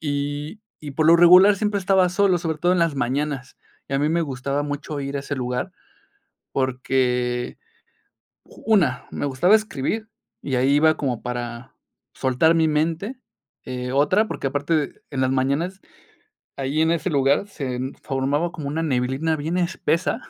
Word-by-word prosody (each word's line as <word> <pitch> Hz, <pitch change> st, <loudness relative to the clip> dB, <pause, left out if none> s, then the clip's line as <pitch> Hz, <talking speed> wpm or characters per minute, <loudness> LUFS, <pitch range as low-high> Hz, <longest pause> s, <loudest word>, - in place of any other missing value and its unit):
Y 145 Hz, +5 st, -3 dB, 0.2 s
y, 145 Hz, -2 st, -7 dB
por 155 Hz, +2 st, +1 dB
lo 170 Hz, -, +7 dB
regular, 180 Hz, +4 st, +7 dB
siempre 205 Hz, 0 st, -1 dB
estaba 190 Hz, -1 st, +3 dB
solo, 185 Hz, 0 st, +2 dB
sobre 160 Hz, -2 st, -3 dB
todo 175 Hz, +3 st, +2 dB
en 180 Hz, -, +1 dB
las 165 Hz, -3 st, +2 dB
mañanas. 135 Hz, +1 st, -2 dB, 0.3 s
Y 135 Hz, -, -3 dB
a 135 Hz, -, +2 dB
mí 150 Hz, -, +1 dB
me 170 Hz, +1 st, +1 dB
gustaba 140 Hz, 0 st, -2 dB
mucho 145 Hz, 0 st, -4 dB
ir 140 Hz, 0 st, -4 dB
a -, -, -2 dB
ese 140 Hz, +1 st, -4 dB
lugar 125 Hz, +6 st, -3 dB, 0.8 s
porque, 125 Hz, -2 st, -1 dB, 1.1 s
una, 210 Hz, -7 st, +2 dB
me -, -, -4 dB
gustaba 145 Hz, +10 st, +3 dB
escribir 215 Hz, +1 st, -3 dB, 0.3 s
y 135 Hz, -3 st, -2 dB
ahí 130 Hz, +2 st, +2 dB
iba 155 Hz, +1 st, +4 dB
como 125 Hz, -5 st, -2 dB
para 120 Hz, -1 st, -6 dB, 0.4 s
soltar 130 Hz, +6 st, +2 dB
mi 160 Hz, -1 st, +3 dB
mente. 165 Hz, -, -1 dB, 0.5 s
Eh, 125 Hz, 0 st, -5 dB
otra, 185 Hz, +11 st, +3 dB
porque 135 Hz, -, -3 dB
aparte, 145 Hz, +2 st, -1 dB
en 135 Hz, -, -3 dB
las 130 Hz, -, +1 dB
mañanas, 140 Hz, +9 st, -1 dB, 0.8 s
ahí 140 Hz, +3 st, -2 dB
en 160 Hz, -, +3 dB
ese 170 Hz, +2 st, -1 dB
lugar, 140 Hz, +4 st, +2 dB
se 130 Hz, -9 st, -4 dB, 0.2 s
formaba 140 Hz, +5 st, -1 dB
como 145 Hz, -3 st, -6 dB
una 160 Hz, +3 st, -2 dB
neblina 135 Hz, +3 st, 0 dB
bien 160 Hz, +4 st, -2 dB
espesa 180 Hz, +4 st, 0 dB
145 Hz, 160 wpm, -23 LUFS, 135-170 Hz, 1.1 s, lo